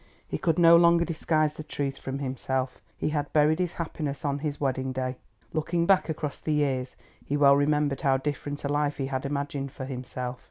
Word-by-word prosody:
He - - -3
could 165 -2 +1
no 170 -1 +8
longer 170 0 +5
disguise 155 -2 +1
the 155 - -8
truth 140 -2 -3
from 135 0 -4
himself—he 130 0 -3
had 145 -1 -2
buried 155 +2 +4
his 180 -2 0
happiness 155 -3 -4
on 140 0 0
his 150 -1 -3
wedding 130 -1 -1
day. 130 0 -2 0.4
Looking 170 +2 0
back 190 -2 +3
across 150 -2 -4
the 155 - -1
years, 135 -4 0 0.3
he 145 - -1
well 140 -1 +6
remembered 145 -1 +1
how 135 -1 +3
different 145 +1 -4
a - - +1
life 145 0 0
he 135 - -1
had 135 0 -2
imagined 140 -1 -3
for 130 - -6
himself. 125 -1 -5
145 Hz, 195 wpm, -27 LUFS, 135-155 Hz, 0.4 s, no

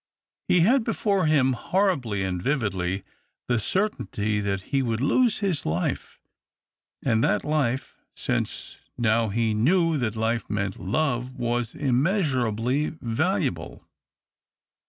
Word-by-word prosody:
He 180 - +4
had 240 +8 +4
before 200 -5 +1
him, 135 -4 +3
horribly 130 - 0
and 90 -2 -2
vividly, 95 -8 -1 0.4
the 120 -2 +2
certainty 110 - -1
that 100 -1 -1
he 135 - +3
would 115 -3 -1
lose 220 - +2
his 180 -7 0
life, 80 +3 -2 0.8
and 115 -3 +2
that 105 - +2
life 140 -4 -1
— - - -52
since - - -3 0.2
now 115 -1 +2
he 110 +1 0
knew 165 - +2
that 115 -3 -1
life 115 +1 -1
meant 100 -2 -2
love 125 +3 -1
— - - -15
was 120 -1 -1
immeasurably 135 - +1
valuable. 115 -1 -2
120 Hz, 125 wpm, -25 LUFS, 110-155 Hz, 0.8 s, He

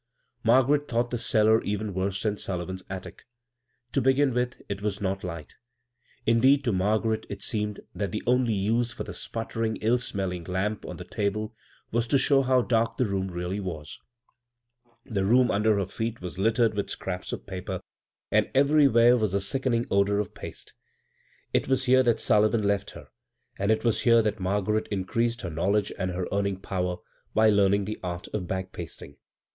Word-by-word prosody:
Margaret 130 +5 +4
thought 120 0 0
the 120 - -2
cellar 110 -1 +3
even 105 0 -3
worse 95 +2 -2
than 105 -2 +1
Sullivan's 95 -1 -4
attic. 95 +5 -8 0.6
To - - +1
begin 135 +1 +3
with, 125 0 -1
it 100 0 -4
wa« 105 - +1
not 95 -1 -2
light; 85 -4 -6 0.7
indeed, 130 +5 +4
to 120 - +1
Margaret 110 +3 0
it - - -6
seemed 105 -2 -2
that 100 -3 -3
the - - -3
only 125 -2 +2
use 115 +5 +1
for - - -5
the - - -7
sputtering, 115 0 -3
ill 115 +3 +2
smell 95 -6 -2
ing 90 -2 -6
lamp 95 +4 -2
on - - -6
the - - -7
table 105 +2 -2 0.4
was 115 +1 0
to 140 - +3
show 135 +1 +4
how 130 -1 +3
darlc 115 -1 +1
the 125 - +2
room 95 -2 -1
realty 90 +3 -3
was. 80 -6 -6 1.1
The 105 -7 -1
floor 120 +5 +4
under 105 +1 +2
her 100 - 0
feet 115 +4 -4
was 90 +1 -7
littered 115 +2 +3
with 100 -1 -2
scraps 90 -1 -4
of - - -6
paper, 95 -1 -5 0.5
and - - +3
everywhere 135 -4 +5
was 110 -5 0
the - - +3
uckening 120 +4 0
odor 100 +1 +3
of 105 -1 -2
paste. - - -8 0.8
It - - +1
was 130 -1 +2
here 130 0 +5
that 120 -3 +2
Sullivan 110 +1 +3
left 100 0 0
her, - - -13 0.5
and 100 +2 0
it 110 - +1
was 115 -3 +1
here 115 -1 +5
that 105 0 -1
Margaret 100 +3 0
increased 115 +5 -1
her 85 - -5
knowledge 100 +6 0
and 95 -1 -2
her 90 0 -3
earning 100 -1 0
power 90 -2 -2 0.4
by 110 0 +5
learning 100 0 +3
the 110 +2 -5
art 90 0 -4
of 95 -4 -4
bag 95 0 -3
pasting. 75 -4 -8
105 Hz, 185 wpm, -27 LUFS, 95-115 Hz, 1.1 s, everywhere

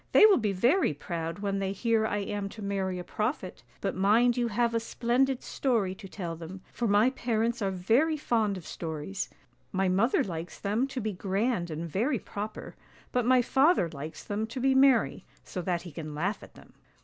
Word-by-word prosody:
They - - +9
will 415 -7 +6
be 215 -3 0
very 240 - +2
proud 165 +2 -4
when 200 -1 -2
they 195 0 -1
hear 225 +1 +1
I 205 - -1
am 205 0 -3
to 215 +1 -9
marry 195 -2 -1
a 180 - -5
prophet; 215 - -3 0.2
but - - -1
mind 225 +6 +4
you 245 -1 +1
have 235 +1 +1
a 230 - +2
splendid 250 +3 0
story 225 -9 0
to 195 - -10
tell 175 -3 -5
them, 170 +3 -9
for 235 - -1
my 210 +5 +4
parents 235 -2 -1
are 195 - +1
very 230 - +2
fond 220 -8 +1
of 175 - -10
stories: 165 +4 -4 0.4
my 190 0 +1
mother 195 +7 +3
likes 170 -2 -6
them 215 +6 0
to 270 -1 -5
be 215 -1 -2
grand 195 0 -1
and 160 +2 -4
very 235 - 0
proper, 210 0 -6 0.4
but 245 -1 +1
my 255 -1 +5
father 270 - +3
likes 155 +1 -8
them 210 +2 -2
to 250 +3 -6
be 265 +1 +3
merry, 265 -7 +4 0.2
so 180 - -5
that 175 -1 -1
he 175 - -9
can 155 0 -7
laugh 195 +7 -1
at - - -14
them." - - -17
205 Hz, 200 wpm, -29 LUFS, 185-240 Hz, 0.4 s, They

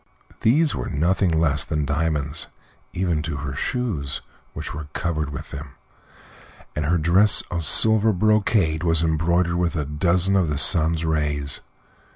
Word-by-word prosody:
These 145 +7 +2
were - - -5
nothing 90 +5 0
less 80 -3 0
than 75 -2 -3
diamonds, 75 +1 -2 0.4
even 85 -4 -2
to 75 -2 -5
her 70 -1 -6
shoes, 75 - -3 0.3
which - - -7
were 75 0 -7
covered 75 -4 -3
with 70 - -9
them, 70 0 -9 1.0
and 75 - -2
her 85 +4 +1
dress 90 +6 +4
of 85 -3 -3
silver 110 +7 +5
brocade 100 -5 +1
was 80 -1 +2
embroidered 85 +2 0
with 85 -1 -1
a 75 -3 -2
dozen 85 +6 +1
of 90 -5 +1
the 75 - -2
sun's 80 +1 +5
rays. 75 -3 -2
80 Hz, 150 wpm, -22 LUFS, 75-90 Hz, 1.0 s, silver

